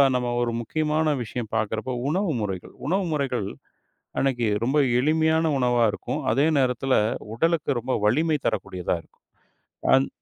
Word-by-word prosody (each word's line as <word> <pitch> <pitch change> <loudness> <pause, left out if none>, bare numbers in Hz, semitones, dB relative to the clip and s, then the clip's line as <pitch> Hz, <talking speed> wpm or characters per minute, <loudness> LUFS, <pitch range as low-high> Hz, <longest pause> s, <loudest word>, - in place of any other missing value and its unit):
நம்ம 125 -1 0
ஒரு 120 -1 0
முக்கியமான 155 +4 0
விஷயம் 115 -1 -5
பாக்கறப்போ 110 +3 -1
உணவு 185 +1 0
முறைகள். 95 -3 -5
உணவு 190 +3 +1
முறைகள் 130 -8 -1 0.7
அன்னைக்கு 125 -4 +1 0.2
ரொம்ப 135 +4 +1 0.2
எளிமையான 160 +3 +2
உணவா 120 -1 +3
இருக்கும். 150 - -4
அதே 140 +5 +3
நேரத்துல 130 +1 +1 0.4
உடலுக்கு 165 +4 +1
ரொம்ப 130 +2 -2
வலிமை 150 +8 +3
தரக்கூடியதா 95 -4 -2
இருக்கும். - - -32 0.7
ஆந் 135 +1 +4
130 Hz, 130 wpm, -25 LUFS, 120-155 Hz, 0.7 s, ஆந்